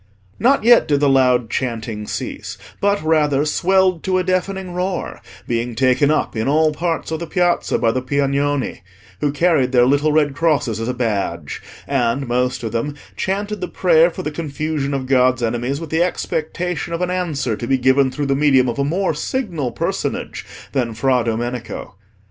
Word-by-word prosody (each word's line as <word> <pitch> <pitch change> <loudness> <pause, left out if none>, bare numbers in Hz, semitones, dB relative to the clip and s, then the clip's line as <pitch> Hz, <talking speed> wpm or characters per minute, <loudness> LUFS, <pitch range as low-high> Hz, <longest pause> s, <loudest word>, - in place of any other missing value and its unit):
Not 270 +1 +3
yet 240 +1 +6
did 145 -1 +2
the 145 - +3
loud 125 -4 +3
chanting 115 -4 -3
cease, - - -5 0.2
but 200 -3 +1
rather 150 -3 +2
swelled 185 +2 +2
to 185 -1 +1
a 185 - +1
deafening 185 0 -1
roar, 180 +1 -3 0.3
being 120 0 -2
taken 130 +3 +3
up 155 - 0
in 110 +2 -1
all 155 +2 +3
parts 165 +1 -2
of 160 - -2
the 170 - -5
Piazza 175 -1 +1
by 115 - +2
the 130 - -1
Piagnoni, 140 -2 -1 0.4
who 145 - 0
carried 145 -4 +2
their 120 -1 +5
little 145 +4 +2
red 150 -2 +2
crosses 145 -8 0
as 115 - -3
a 125 - -2
badge, 100 - -2 0.3
and, 135 0 0
most 125 +1 0
of 115 - -3
them, 130 +6 -2 0.2
chanted 205 +2 -2
the 180 - -2
prayer 170 -1 +4
for 165 - -7
the 150 - -3
confusion 150 -2 -3
of 135 -1 -3
God's 130 -1 +3
enemies 120 +4 -1
with 165 -2 -8
the 160 +1 +2
expectation 175 0 -2
of 170 +2 -1
an 180 - -1
answer 155 -10 -1
to 120 - -6
be 135 - +2
given 130 +1 +3
through 145 +2 -3
the 135 0 +1
medium 135 -3 +4
of 120 +2 -3
a - - +2
more 175 +5 0
signal 165 - -2
personage - - -3 0.3
than 120 -5 -1
Fra 130 +2 +2
Domenico. 120 +1 -4
140 Hz, 185 wpm, -19 LUFS, 125-170 Hz, 0.4 s, yet